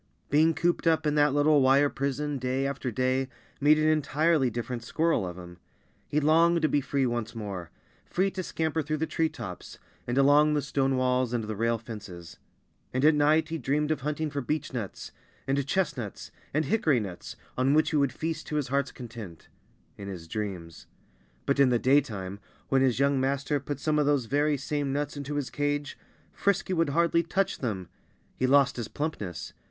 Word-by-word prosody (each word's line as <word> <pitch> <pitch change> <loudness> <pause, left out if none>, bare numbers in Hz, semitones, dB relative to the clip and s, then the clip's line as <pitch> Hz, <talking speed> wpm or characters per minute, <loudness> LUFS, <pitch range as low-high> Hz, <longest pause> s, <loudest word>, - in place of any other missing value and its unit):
Being 155 +2 +4
cooped 175 0 0
up 160 -1 +3
in 150 - +2
that 150 -1 +4
little 145 +1 +4
wire 135 +2 +5
prison 140 +1 -2
day 130 +2 -1
after 140 -2 -2
day 130 +3 0 0.3
made 150 +1 +5
an 155 0 +2
entirely 155 -1 +2
different 120 +1 -4
squirrel 155 - 0
of 90 0 -7
him. 90 -1 -11 0.5
He 150 - +1
longed 165 +3 +4
to - - +5
be 145 -1 +1
free 140 0 0
once 120 -2 -2
more 100 -6 -5 0.3
free 195 +2 0
to 190 - -4
scamper 160 -2 -1
through 155 +1 -2
the 160 - 0
tree 160 0 0
tops, 90 - -8 0.3
and 120 +2 -1
along 145 +2 +5
the 145 - 0
stone 135 -2 0
walls 125 -1 +1
and 120 -2 0
the 110 0 -4
rail 115 +2 +1
fences. 100 -7 -10 0.5
And 130 +3 +1
at 155 - +7
night 150 +2 +3
he 165 0 -3
dreamed 150 +4 0
of 155 - -1
hunting 150 +2 -2
for 140 - -2
beechnuts, 125 -6 -4 0.3
and 135 +1 +1
chestnuts, 145 - -2 0.2
and 155 +2 0
hickorynuts, 135 - 0 0.2
on 130 +3 +2
which 155 - +3
he 155 - +2
would 140 -3 +2
feast 160 0 -4
to 150 - -4
his 145 -4 -1
heart's 140 0 0
content 110 -9 -10 0.5
in 100 - -7
his 90 -4 -7
dreams. 90 -4 -6 0.6
But 140 0 +1
in 140 -2 +6
the 120 - +3
daytime, 110 -8 +1 0.3
when 135 -1 +3
his 130 -3 +2
young 140 0 +2
master 140 +2 0
put 140 0 -5
some 150 0 +1
of 145 - +2
those 145 -4 +2
very 145 +4 +1
same 145 +1 -2
nuts 145 +1 -2
into 145 0 -5
his 145 -3 -2
cage, 145 0 -2 0.4
Frisky 200 -1 0
would 165 -3 +1
hardly 170 +3 +3
touch 180 +4 -1
them. 100 -8 -3 0.5
He 130 - 0
lost 140 0 +4
his 120 -3 -3
plumpness. 100 - -5
140 Hz, 190 wpm, -28 LUFS, 120-150 Hz, 0.6 s, at